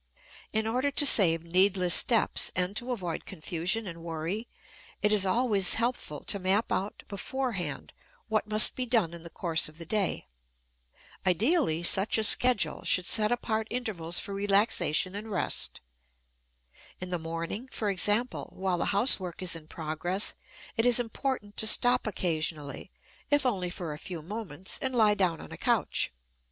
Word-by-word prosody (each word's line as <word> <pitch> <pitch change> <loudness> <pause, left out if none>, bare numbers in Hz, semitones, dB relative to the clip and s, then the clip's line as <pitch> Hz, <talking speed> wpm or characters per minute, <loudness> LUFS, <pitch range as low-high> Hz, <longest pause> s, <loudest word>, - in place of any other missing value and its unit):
In 220 0 0
order 250 +5 0
to 290 +1 +4
save 165 - +6
needless 185 +1 +3
steps 230 -3 +4
and 185 +2 0
to 240 +3 -3
avoid 180 -9 -5
confusion 180 +4 -2
and 170 -3 -8
worry, 170 +7 -4 0.6
it 210 - +2
is 200 -2 +3
always 205 -2 +3
helpful 230 -10 -3
to 200 - +1
map 195 +4 +1
out 195 +2 -3
beforehand 220 -1 -4 0.3
what 215 -1 -1
must 215 0 +6
be 255 -1 -3
done 220 -9 +1
in 170 - -10
the 170 - -10
course 165 -2 -1
of 155 - -18
the 165 - -8
day. 195 - -1 1.0
Ideally, 190 - +1
such 195 +5 +3
a 220 - 0
schedule 245 0 +3
should 185 - +1
set 215 +3 +2
apart 220 -2 -2
intervals 200 -9 -3
for 200 - -4
relaxation 195 -3 +1
and 210 +2 -7
rest. 195 -4 -1 1.2
In 180 0 -6
the 175 - -2
morning, 165 +9 -5
for 215 - -3
example, 210 +6 +1
while 185 -2 -2
the - - -1
housework 195 -4 +1
is 175 -2 +2
in 155 -2 -10
progress, 165 +5 -3 0.4
it 225 - +1
is 245 0 +5
important 235 -3 -4
to 220 - +2
stop 245 +1 +4
occasionally, 155 -6 -3 0.4
if 290 -2 +2
only 190 -8 -1
for 175 -3 -5
a 150 - -9
few 170 -4 -7
moments, 190 -2 -6
and 260 -1 -2
lie 215 -3 +4
down 185 -5 0
on - - -11
a - - -8
couch. - - 0
195 Hz, 160 wpm, -28 LUFS, 170-225 Hz, 1.2 s, save